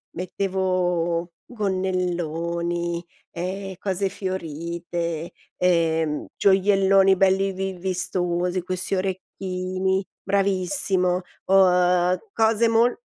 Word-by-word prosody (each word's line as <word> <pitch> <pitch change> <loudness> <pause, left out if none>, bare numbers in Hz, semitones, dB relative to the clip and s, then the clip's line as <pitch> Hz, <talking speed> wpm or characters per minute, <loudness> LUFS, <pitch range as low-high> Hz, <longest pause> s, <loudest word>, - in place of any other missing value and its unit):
mettevo 180 -2 -1
gonnelloni, 175 -4 -2 0.3
ehm, 190 +3 -4
cose 195 0 -1
fiorite, 170 -2 -4 0.3
ehm, 165 -3 +1
gioielloni 195 0 +4
belli 195 +1 +3
vi 190 +1 -3
vistosi, 180 -1 -1
questi 185 +2 -2
orecchini. 185 0 -2 0.2
Bravissimo. 190 -2 +1 0.3
Uhm, 180 -1 +4 0.2
cose 225 +1 +3
mol 230 +2 +3
185 Hz, 75 wpm, -24 LUFS, 175-195 Hz, 0.3 s, gioielloni